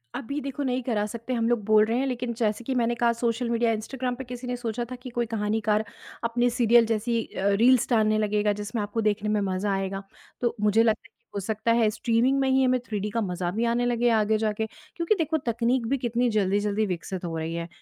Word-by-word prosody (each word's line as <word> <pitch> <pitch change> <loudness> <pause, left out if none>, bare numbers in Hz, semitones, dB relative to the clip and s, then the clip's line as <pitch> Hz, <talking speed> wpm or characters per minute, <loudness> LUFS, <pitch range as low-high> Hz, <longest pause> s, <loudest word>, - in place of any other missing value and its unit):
अभी 280 +5 -3
देखो 275 +1 -4
नहीं 255 -1 0
करा 220 -4 0
सकते, 230 +4 -5
हम 230 -2 +1
लोग 240 -3 +1
बोल 215 0 +5
रहे 225 +2 0
हैं 270 - +1
लेकिन 250 -2 -2
जैसे 220 -1 -1
कि 260 +2 -2
मैंने 240 -1 +1
कहा 235 0 +2
सोशल 235 +1 -1
मीडिया, 235 0 +2
इंस्टाग्राम 245 +3 -3
पे 265 - -6
किसी 250 0 -7
ने 250 - -1
सोचा 240 0 -3
था - - -3
कि 250 +1 -9
कोई 240 0 -1
कहानीकार 215 -1 0 0.4
अपने 235 +1 +1
अ, - - +4
सीरियल 235 -1 +4
जैसी 230 +1 0 0.2
रील्स 220 +6 +4
डालने 215 -3 +3
लगेगा 210 -1 +1
जिसमें 210 +2 -4
आपको 205 +2 -2
देखने 210 0 0
में 210 0 +2
मज़ा 195 +1 -1
आएगा। 195 0 -3 0.4
तो 240 -1 0
मुझे 210 +2 +4
लगता 220 -1 +2
है - - -39
कि 235 - -47
हो - - 0
सकता 220 +3 -1
है 230 -2 +4
स्ट्रीमिंग 240 +5 +1
में 270 -1 +2
ही 265 0 +4
हमें 255 0 +3
थ्रीडी 210 -1 -2
का 230 +2 -1
मज़ा 180 -3 -2
भी 225 +5 -1
आने 235 +1 +1
लगे 240 0 +2
आगे 220 -1 +3
जाके 215 0 -1 0.3
क्योंकि 340 +3 +1
देखो 320 -3 0
तकनीक 235 -2 0
भी 275 +4 +1
कितनी 240 -1 0
जल्दी-जल्दी 205 0 +1
विकसित 180 0 -4
हो 165 -1 -3
रही 160 +1 -3
है। 170 0 -4
230 Hz, 230 wpm, -26 LUFS, 210-245 Hz, 0.4 s, बोल